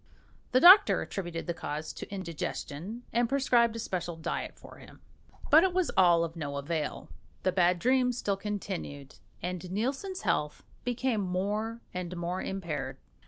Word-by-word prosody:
The 255 Hz, -, +5 dB
doctor 375 Hz, +7 st, +8 dB
attributed 175 Hz, -4 st, -5 dB
the 170 Hz, -, -2 dB
cause 155 Hz, -1 st, -5 dB
to -, -, -8 dB
indigestion, 185 Hz, +3 st, -5 dB
and 235 Hz, 0 st, +2 dB
prescribed 245 Hz, -4 st, +3 dB
a -, -, -3 dB
special 175 Hz, -5 st, -3 dB
diet 160 Hz, -, -4 dB
for -, -, -13 dB
him. -, -, -15 dB, 0.5 s
But 315 Hz, +3 st, +8 dB
it 370 Hz, -1 st, +1 dB
was 370 Hz, -2 st, +1 dB
all 175 Hz, -3 st, +5 dB
of 165 Hz, 0 st, -4 dB
no 145 Hz, -4 st, -4 dB
avail; 150 Hz, +2 st, -3 dB, 0.3 s
the 185 Hz, -, +2 dB
bad 180 Hz, -1 st, +3 dB
dreams 250 Hz, +4 st, +2 dB
still 200 Hz, -4 st, 0 dB
continued, 190 Hz, -9 st, -5 dB, 0.3 s
and 180 Hz, 0 st, -4 dB
Nielsen's 270 Hz, -, -2 dB
health 150 Hz, -6 st, -1 dB, 0.2 s
became 245 Hz, -2 st, 0 dB
more 205 Hz, +5 st, -2 dB
and 180 Hz, -1 st, -4 dB
more 175 Hz, +2 st, -2 dB
impaired. 170 Hz, -8 st, -4 dB
190 Hz, 155 wpm, -30 LUFS, 170-235 Hz, 0.5 s, doctor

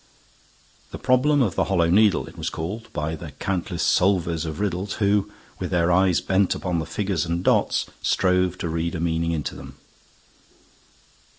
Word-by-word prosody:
The -, -, -7 dB
problem 135 Hz, +3 st, +3 dB
of 100 Hz, -7 st, 0 dB
the -, -, +1 dB
Hollow 85 Hz, -4 st, +2 dB
Needle 105 Hz, 0 st, +4 dB
it -, -, -13 dB
was -, -, -3 dB
called, 95 Hz, +9 st, -6 dB
by 75 Hz, +2 st, -3 dB
the 80 Hz, -2 st, -9 dB
countless 90 Hz, +1 st, -3 dB
solvers 85 Hz, -4 st, +2 dB
of 80 Hz, +3 st, -5 dB
riddles 100 Hz, -1 st, -2 dB
who, 100 Hz, 0 st, +1 dB, 0.3 s
with -, -, -3 dB
their 90 Hz, 0 st, +2 dB
eyes 95 Hz, 0 st, +3 dB
bent 95 Hz, 0 st, +1 dB
upon 90 Hz, -2 st, -2 dB
the 80 Hz, -, -4 dB
figures 95 Hz, -1 st, -1 dB
and 85 Hz, +1 st, -2 dB
dots, -, -, +2 dB, 0.2 s
strove 90 Hz, -1 st, +1 dB
to 85 Hz, -, -3 dB
read 85 Hz, +1 st, -2 dB
a -, -, -3 dB
meaning 85 Hz, 0 st, 0 dB
into 80 Hz, -3 st, -3 dB
them. -, -, -11 dB
90 Hz, 170 wpm, -23 LUFS, 85-100 Hz, 0.3 s, Needle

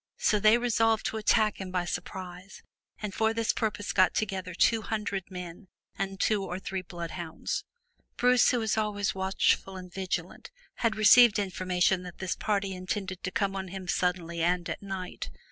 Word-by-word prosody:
So 210 Hz, -, +2 dB
they 215 Hz, +3 st, +6 dB
resolved 225 Hz, -2 st, +2 dB
to 220 Hz, -, -1 dB
attack 215 Hz, -1 st, +2 dB
him 190 Hz, -, -5 dB
by 180 Hz, -1 st, -1 dB
surprise, 180 Hz, +2 st, -6 dB, 0.4 s
and 205 Hz, -2 st, -3 dB
for 220 Hz, 0 st, +1 dB
this 225 Hz, -1 st, +1 dB
purpose 210 Hz, -2 st, -2 dB
got 185 Hz, -2 st, +4 dB
together 190 Hz, -4 st, -2 dB
two 225 Hz, +4 st, +3 dB
hundred 210 Hz, -4 st, -3 dB
men 180 Hz, +1 st, -8 dB, 0.3 s
and 195 Hz, 0 st, -3 dB
two 210 Hz, -2 st, +2 dB
or 180 Hz, -1 st, -4 dB
three 190 Hz, 0 st, -4 dB
bloodhounds. 170 Hz, -2 st, -5 dB, 0.5 s
Bruce 250 Hz, 0 st, +5 dB
who 250 Hz, -, +2 dB
was 220 Hz, -1 st, 0 dB
always 205 Hz, -2 st, -1 dB
watchful 190 Hz, 0 st, +1 dB
and 180 Hz, -1 st, -10 dB
vigilant, 180 Hz, -2 st, -4 dB, 0.3 s
had 230 Hz, -2 st, +1 dB
received 220 Hz, +1 st, +7 dB
infor 185 Hz, -2 st, -2 dB
mation 180 Hz, 0 st, +3 dB
that 180 Hz, -1 st, -9 dB
this 190 Hz, -1 st, -2 dB
party 200 Hz, -2 st, -1 dB
intended 185 Hz, 0 st, -4 dB
to -, -, -2 dB
come 195 Hz, -1 st, -1 dB
on 190 Hz, 0 st, -4 dB
him 185 Hz, 0 st, -7 dB
suddenly 175 Hz, -2 st, -1 dB
and 175 Hz, +1 st, +1 dB
by -, -, -3 dB
night. 190 Hz, -2 st, -5 dB
195 Hz, 175 wpm, -29 LUFS, 180-215 Hz, 0.5 s, received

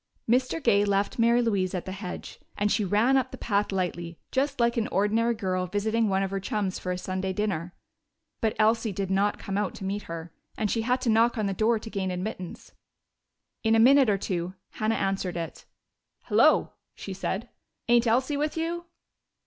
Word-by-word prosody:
Mr. 255 Hz, +6 st, +2 dB
Gay 205 Hz, -4 st, +4 dB
left 200 Hz, +2 st, 0 dB
Mary 235 Hz, +1 st, +4 dB
Louise 195 Hz, -5 st, 0 dB
at 180 Hz, -, -3 dB
the 190 Hz, -, -5 dB
hedge, 190 Hz, -1 st, -7 dB, 0.2 s
and 205 Hz, 0 st, +1 dB
she 215 Hz, -, +2 dB
ran 215 Hz, +7 st, +3 dB
up 260 Hz, -1 st, +2 dB
the -, -, -9 dB
path 205 Hz, -2 st, 0 dB
lightly, 175 Hz, -3 st, -3 dB
just 275 Hz, +1 st, 0 dB
like 235 Hz, 0 st, +3 dB
an 230 Hz, -2 st, 0 dB
ordinary 220 Hz, +4 st, +1 dB
girl 185 Hz, -4 st, -1 dB
visiting 215 Hz, +3 st, 0 dB
one 195 Hz, 0 st, +1 dB
of 195 Hz, -, -3 dB
her 195 Hz, -, -1 dB
chums 195 Hz, -1 st, -2 dB
for 180 Hz, -, -3 dB
a 180 Hz, -, -2 dB
Sunday 185 Hz, +1 st, -3 dB
dinner. 185 Hz, -4 st, -2 dB, 0.7 s
But 220 Hz, -1 st, +1 dB
Elsie 220 Hz, 0 st, +2 dB
did 195 Hz, 0 st, -3 dB
not 200 Hz, +2 st, +2 dB
come 195 Hz, +1 st, -3 dB
out 210 Hz, -, -2 dB
to -, -, -8 dB
meet 200 Hz, +2 st, -2 dB
her, 165 Hz, 0 st, -6 dB, 0.2 s
and 210 Hz, -2 st, 0 dB
she 225 Hz, -, +1 dB
had 250 Hz, +3 st, +1 dB
to 245 Hz, -, 0 dB
knock 230 Hz, +2 st, +3 dB
on 215 Hz, -, 0 dB
the 195 Hz, -, 0 dB
door 225 Hz, +4 st, +2 dB
to 220 Hz, +1 st, -8 dB
gain 190 Hz, -2 st, -2 dB
admittance. 185 Hz, 0 st, -5 dB, 0.9 s
In 225 Hz, 0 st, +4 dB
a -, -, +4 dB
minute 265 Hz, +1 st, +6 dB
or 200 Hz, -, +3 dB
two 180 Hz, -1 st, -3 dB, 0.2 s
Hannah 220 Hz, +1 st, 0 dB
answered 190 Hz, -2 st, -1 dB
it. 165 Hz, -1 st, -6 dB, 0.6 s
"Hello!" -, -, +4 dB, 0.2 s
she 195 Hz, -, -6 dB
said. 195 Hz, +4 st, -3 dB, 0.4 s
"Ain't 240 Hz, 0 st, +4 dB
Elsie 260 Hz, +5 st, +2 dB
with 300 Hz, +2 st, -1 dB
you?" 340 Hz, +1 st, -2 dB
205 Hz, 195 wpm, -27 LUFS, 190-230 Hz, 0.9 s, minute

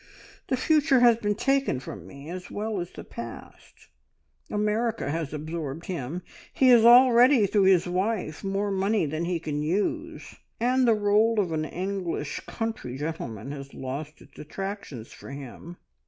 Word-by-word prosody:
The 260 Hz, -, 0 dB
future 285 Hz, -2 st, +3 dB
has 240 Hz, -2 st, +6 dB
been 205 Hz, -2 st, -1 dB
taken 270 Hz, -, +1 dB
from -, -, -9 dB
me, 140 Hz, +1 st, -11 dB
as 180 Hz, 0 st, -7 dB
well 215 Hz, -1 st, -3 dB
as 175 Hz, -, -6 dB
the -, -, -10 dB
past. 115 Hz, -1 st, -10 dB, 0.6 s
America 210 Hz, -4 st, 0 dB
has 160 Hz, -2 st, -3 dB
absorbed 155 Hz, 0 st, -5 dB
him. 170 Hz, 0 st, -4 dB, 0.3 s
He 260 Hz, -, +4 dB
has 240 Hz, -3 st, +7 dB
already, 245 Hz, 0 st, +7 dB
through 200 Hz, 0 st, +2 dB
his 190 Hz, -3 st, +5 dB
wife, 185 Hz, -2 st, -2 dB
more 200 Hz, +1 st, -1 dB
money 195 Hz, 0 st, +1 dB
than 155 Hz, +3 st, -2 dB
he 175 Hz, -1 st, -1 dB
can 150 Hz, -2 st, -3 dB
use, 315 Hz, -, -2 dB, 0.3 s
and 250 Hz, +2 st, +2 dB
the 230 Hz, -, +5 dB
role 210 Hz, +2 st, +3 dB
of 185 Hz, -5 st, 0 dB
an 155 Hz, -1 st, -1 dB
English 180 Hz, -4 st, -3 dB
country 225 Hz, -, -4 dB
gentleman 135 Hz, -6 st, -5 dB
has 140 Hz, -1 st, -8 dB
lost 145 Hz, +4 st, -6 dB
its -, -, -18 dB
attractions 175 Hz, -, -6 dB
for -, -, -12 dB
him. 140 Hz, +5 st, -9 dB
190 Hz, 155 wpm, -26 LUFS, 155-225 Hz, 0.6 s, has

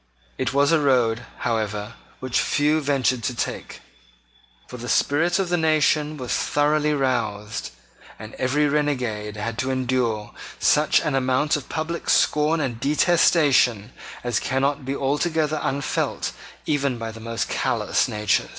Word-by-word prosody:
It -, -, 0 dB
was 140 Hz, +2 st, +3 dB
a 165 Hz, -, +4 dB
road, 120 Hz, -5 st, +2 dB, 0.2 s
however, 110 Hz, -2 st, -2 dB, 0.3 s
which 130 Hz, -2 st, 0 dB
few 150 Hz, +1 st, +1 dB
ventured 135 Hz, -4 st, +1 dB
to 125 Hz, -, -2 dB
take. -, -, -5 dB, 0.8 s
For 125 Hz, -, -9 dB
the 120 Hz, +1 st, -7 dB
spirit 160 Hz, +6 st, +2 dB
of 195 Hz, -3 st, -1 dB
the 175 Hz, -, +1 dB
nation 155 Hz, -1 st, +2 dB
was 125 Hz, -3 st, -3 dB
thoroughly 150 Hz, +1 st, +1 dB
roused; 110 Hz, -7 st, -2 dB, 0.5 s
and 110 Hz, 0 st, -10 dB
every 145 Hz, +4 st, +2 dB
renegade 125 Hz, -8 st, -1 dB
had 110 Hz, +2 st, -4 dB
to 130 Hz, -, -1 dB
endure 125 Hz, -4 st, -1 dB, 0.2 s
such -, -, +3 dB
an -, -, -1 dB
amount 130 Hz, +2 st, +1 dB
of 145 Hz, -, -6 dB
public 165 Hz, +2 st, -4 dB
scorn 150 Hz, +2 st, +3 dB
and 125 Hz, -6 st, -3 dB
detestation, 140 Hz, -, +3 dB, 0.3 s
as 120 Hz, -3 st, 0 dB
cannot 135 Hz, +1 st, -1 dB
be 135 Hz, +1 st, -2 dB
altogether 150 Hz, +2 st, 0 dB
unfelt 140 Hz, -1 st, -2 dB, 0.3 s
even 140 Hz, -4 st, 0 dB
by 115 Hz, -1 st, -5 dB
the 110 Hz, -, -11 dB
most 115 Hz, 0 st, -3 dB
callous -, -, 0 dB
natures. 105 Hz, -1 st, 0 dB
135 Hz, 140 wpm, -23 LUFS, 115-150 Hz, 0.8 s, a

